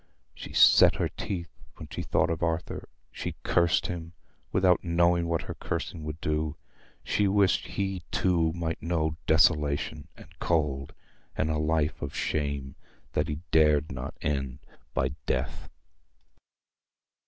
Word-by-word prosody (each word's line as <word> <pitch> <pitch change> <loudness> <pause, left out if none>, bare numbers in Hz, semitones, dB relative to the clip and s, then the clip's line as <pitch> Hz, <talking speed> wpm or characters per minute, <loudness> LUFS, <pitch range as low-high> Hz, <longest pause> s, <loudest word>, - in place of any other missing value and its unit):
She - - -9
set - - +7
her - - 0
teeth 95 -6 -5 0.2
when - - -9
she - - -4
thought - - +1
of 80 - -3
Arthur. 80 -1 -2 0.2
She - - -5
cursed 85 -1 +3
him, 85 -1 -5 0.4
without 90 -1 +3
knowing 85 0 +2
what 85 -1 0
her - - -5
cursing 80 - -4
would 75 +1 -5
do. 75 -1 -1 0.5
She 105 - +1
wished 100 -1 +3
he 95 -2 -2
too 85 -3 +2
might 80 -1 -3
know 80 -1 0
desolation, 75 -1 +2
and 85 +2 -16
cold, 75 -4 0 0.4
and 80 - +1
a 75 - 0
life 75 0 0
of 70 - -5
shame 70 -3 -2 0.4
that - - +1
he 75 +1 -4
dared 75 -1 +4
not 65 0 -6
end 70 -4 -1 0.4
by 65 +1 +2 0.2
death. 65 -1 -2
80 Hz, 140 wpm, -28 LUFS, 75-85 Hz, 0.5 s, set